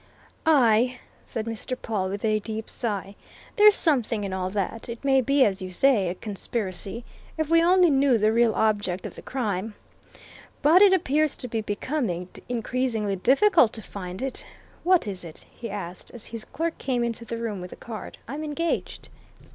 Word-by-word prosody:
"Aye!" 250 -4 +4 0.3
said 225 -2 -4
Mr. 230 +3 -4
Pawle, 195 -4 -2
with 200 +3 -4
a 215 -1 +2
deep 220 +1 -5
sigh. 200 -4 -3 0.4
"There's 420 0 +8
something 240 - +2
in 195 -1 -3
all 185 -1 -2
that. 210 +4 -3
It 235 +3 -7
may 270 -1 +4
be 275 +1 +4
as 195 -2 0
you 185 - -5
say 205 -1 +3
a 180 - -4
conspiracy. 205 +1 -4 0.3
If 315 -1 -1
we 330 0 +6
only 360 -1 +5
knew 270 -3 +4
the 215 +1 +2
real 235 -1 +3
object 205 -4 0
of - - -6
the - - -10
crime! 215 -5 -3 0.9
But 330 +6 +6
it 405 -2 +8
appears 310 -4 +2
to 250 - -6
be 225 -2 -2
becoming 205 - -2 0.2
increasingly 230 -3 -1
difficult 270 - +4
to 220 - -7
find 185 +3 -7
it.... 270 - -4 0.4
What 360 -4 +4
is 190 -3 -5
it?" 165 -2 -11
he 230 - -8
asked, 185 -3 -6
as 235 - -7
his 230 -1 -6
clerk 330 0 -3
came 250 -3 0
into 235 0 -2
the 230 0 -5
room 220 -5 -4
with 180 - -8
a - - -8
card. 225 -2 -8
"I'm 285 +6 -5
engaged." 315 +2 -3
230 Hz, 180 wpm, -25 LUFS, 205-270 Hz, 0.9 s, There's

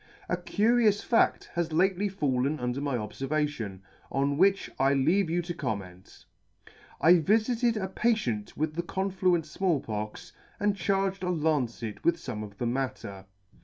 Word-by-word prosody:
" - - -25
A - - +2
curious 215 -1 +2
fadl 230 - +2
has 170 -1 -1
lately 190 +4 +2
fallen 145 -5 0
under 125 +2 -2
my 140 -3 -1
obfervation, 130 -4 -3 0.3
on 140 +1 +1
which 195 +5 +3
I 135 +1 +3
leave 165 +7 +2
you 175 +1 0
to 175 +1 -4
comment. 100 - -6 0.4
" - - -17 0.3
I 175 +2 +7
vifited 225 - +2
a 190 - -2
patient 190 - -1
with 155 +1 -1
the 170 - -1
confluent 185 -2 0
Small 170 -1 0
Pox, 105 -2 -6 0.3
and 205 -1 +1
charged 195 0 0
a 180 - -1
lancet 140 -10 -1
with 170 0 +3
fome 125 -9 -5
of 100 -1 -10
the 120 - -2
matter. 115 -6 -3
160 Hz, 160 wpm, -28 LUFS, 125-190 Hz, 0.4 s, I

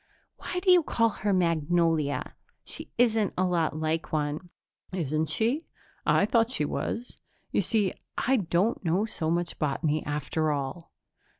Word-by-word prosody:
"Why 360 - -3
do 370 0 +4
you 360 -1 +7
call 230 -6 +2
her 205 -1 -2
Magnolia? 165 -4 +1 0.3
She - - -7
isn't 225 -4 +2
a 185 - +2
lot 170 -4 +1
like 160 +1 -1
one." 150 +3 -2 0.4
"Isn't 160 -3 -1
she? 250 +9 0 0.4
I - - +4
thought 225 +1 +3
she 150 -12 0
was. 235 +10 -4 0.3
You - - +2
see, 210 -5 +1 0.2
I 265 +2 +2
don't 195 +3 +1
know 180 +5 +2
so 160 -7 -2
much 170 0 -1
botany, 150 +1 0
after 150 +2 -1
all." 140 +4 -4
170 Hz, 145 wpm, -28 LUFS, 155-220 Hz, 0.4 s, you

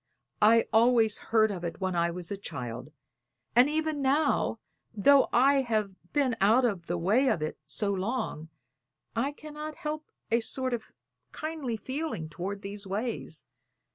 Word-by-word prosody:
I 225 +2 +6
always 225 -1 +4
heard 220 -1 +4
of 180 -3 -5
it 170 +2 -4
when 185 -2 -1
I 170 0 +2
was 175 +1 -5
a - - -1
child; 125 -7 -6 0.6
and 250 +4 +6
even 310 -1 -1
now, 275 -3 +2 0.4
though 275 +6 +5
I 270 +3 +5
have 215 -6 -1 0.2
been 275 -5 +2
out 225 +6 +5
of 195 -7 -1
the 175 - -1
way 210 +11 +3
of 155 - 0
it 155 - -4
so 200 +6 -1
long, 195 -5 -3 0.7
I 255 +5 0
cannot 305 +1 -8
help 305 0 -5 0.2
a 230 - +4
sort 255 +2 -2
of 230 -2 -4 0.4
kindly 305 -7 -4
feeling 260 - -4
toward 195 +5 -5
these 200 0 -6
ways. 215 +5 -3
225 Hz, 155 wpm, -29 LUFS, 190-270 Hz, 0.7 s, I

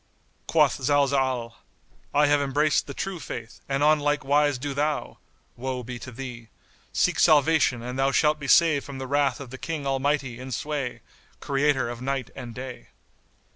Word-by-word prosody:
Quoth - - +3
Zalzal, 135 -5 +1 0.5
"I 150 +1 +4
have 145 0 +3
embraced 145 +2 +1
the 140 - -6
True 195 -3 -4
Faith, 115 -5 -7
and 140 +1 +1
on 155 0 +5
like 145 -1 0
wise 145 0 +3
do 140 +2 -4
thou 150 +2 -2 0.4
(Woe 130 0 -4
be 120 +1 -7
to 130 - -9
thee!) 120 -2 -8 0.4
seek - - +1
salvation 150 -5 +4
and 125 +2 -5
thou 135 0 +3
shalt 150 +1 +2
be 140 - -6
saved 155 -1 +5
from 140 -2 -8
the 130 - -5
wrath 140 +1 +1
of 135 -4 -9
the 130 - -8
King 155 -3 -4
Almighty 135 -2 0
in 130 +1 -7
sway, 140 0 -3 0.4
Creator 140 -1 +1
of 120 0 -6
Night 135 -2 -2
and 120 -3 -8
Day." 125 -1 -8
135 Hz, 175 wpm, -25 LUFS, 130-145 Hz, 0.5 s, on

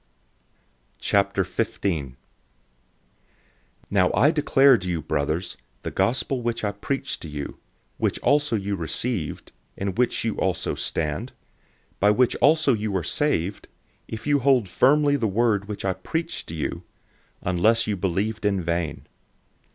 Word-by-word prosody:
015:001 95 - 0 1.8
Now 95 -3 +3
I 135 +10 +5
declare 140 -3 +5
to 90 -1 -5
you, 85 -2 -1
brothers, 75 +4 -2 0.3
the - - -4
Good 95 - +2 0.2
News 130 -3 -1
which 115 -1 -2
I 105 - +1
preached 135 +7 -3
to 80 - -7
you, 75 -1 -6 0.4
which - - 0
also 145 -4 +2
you 100 -1 -1
received, 85 - -3 0.3
in 100 -1 -2
which 120 +2 0
you 110 - 0
also 95 -2 -1
stand, 75 -2 -3 0.6
015:002 - - -37
by 105 - +5
which 120 +4 +3
also 155 -3 +4
you 105 -3 -1
are 90 - -2
saved, 100 - -1 0.4
if 110 - -7
you 145 -1 +3
hold 130 -5 +3
firmly 145 +8 +3
the 115 -5 0
word 105 -1 +1
which 105 -2 -5
I 95 - +1
preached 160 - -4
to 80 - -6
you 75 - -3 0.6
unless 105 +6 +3
you 105 - -1
believed 100 +4 -1
in 100 -2 +2
vain. 85 -1 -2
100 Hz, 145 wpm, -24 LUFS, 90-125 Hz, 1.8 s, I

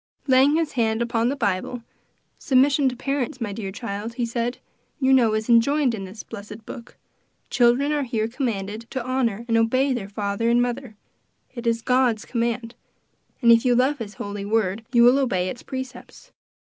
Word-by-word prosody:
Laying 270 +2 +4
his 325 -2 0
hand 225 -3 0
upon 235 0 0
the 275 - -1
Bible, 230 0 -2 0.6
"Submission 270 0 +3
to 250 - -7
parents, 265 0 -3
my 215 -4 -3
dear 195 -2 -5
child," 210 +1 -5
he 240 -1 -1
said, 235 +1 -2 0.4
"you 265 -1 +3
know 235 -4 +4
is 215 0 -2
enjoined 255 +3 +3
in 195 -3 -5
this 195 +4 -9
blessed 210 0 -10
book; 240 -1 -10 0.5
children 250 +4 +3
are 295 -1 +1
here 230 -5 -1
commanded 225 -3 -4
to 260 -3 -4
honor 240 -4 -1
and 230 -1 +2
obey 255 +4 +2
their 210 -5 -4
father 205 +2 -1
and 240 +1 +4
mother; 245 -1 -2 0.6
it 240 -1 -6
is 230 0 0
God's 250 -4 +2
command, 235 -1 -2 0.7
and 235 - +7
if 230 0 +6
you 245 -1 +3
love 265 +4 +2
his 210 -2 -7
holy 205 0 -5
word, 210 0 0
you 235 -2 +5
will 250 +3 +6
obey 185 -9 0
its 245 - -7
precepts. 260 -1 -8
235 Hz, 180 wpm, -23 LUFS, 220-260 Hz, 0.7 s, and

